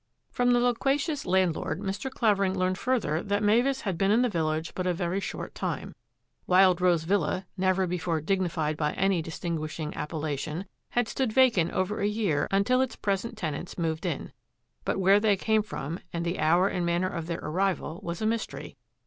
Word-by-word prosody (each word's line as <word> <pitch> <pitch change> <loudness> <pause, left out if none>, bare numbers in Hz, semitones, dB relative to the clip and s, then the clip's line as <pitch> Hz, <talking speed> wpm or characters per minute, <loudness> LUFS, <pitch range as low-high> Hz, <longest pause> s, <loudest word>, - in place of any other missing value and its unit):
From 245 0 +2
the 245 - +4
loquacious 275 - 0
landlord 180 -3 +1
Mr. 200 +6 -3
Clavering 200 -6 +1
learned 185 0 0
further 225 -11 0
that 205 +1 -1
Mavis 245 +6 +3
had 190 -5 -3
been 195 - +3
in 225 +4 +4
the 250 - +2
village 160 -3 -1
but 185 0 -2
a 180 - +1
very 175 +2 -1
short - - -5
time. - - -4 0.5
Wild 185 -1 +5
Rose 175 -3 +3
Villa, 185 0 0
never 185 0 +2
before 175 -2 -1
dignified 160 -3 -1
by 150 -1 0
any 195 -3 +1
distinguishing 160 -1 -4
appellation, 155 +2 -3 0.2
had 240 -2 +1
stood 260 -1 -1
vacant 225 -9 +4
over 185 +3 -1
a 200 - +1
year 205 -9 0
until 200 +7 +3
its 260 - -1
present 205 +3 -2
tenants 160 -3 -4
moved 160 -2 -1
in; - - -3 0.5
but - - 0
where 195 +1 +5
they 205 -2 +3
came 220 +2 +2
from, 170 -5 -5
and 170 0 -3
the 170 +2 -2
hour 170 +5 +4
and 180 -3 -1
manner 170 +1 +1
of 165 -3 -4
their 170 -1 -2
arrival 175 0 -1
was 170 +4 -4
a - - +1
mys 225 0 0
tery. - - -9
185 Hz, 185 wpm, -28 LUFS, 165-210 Hz, 0.5 s, Wild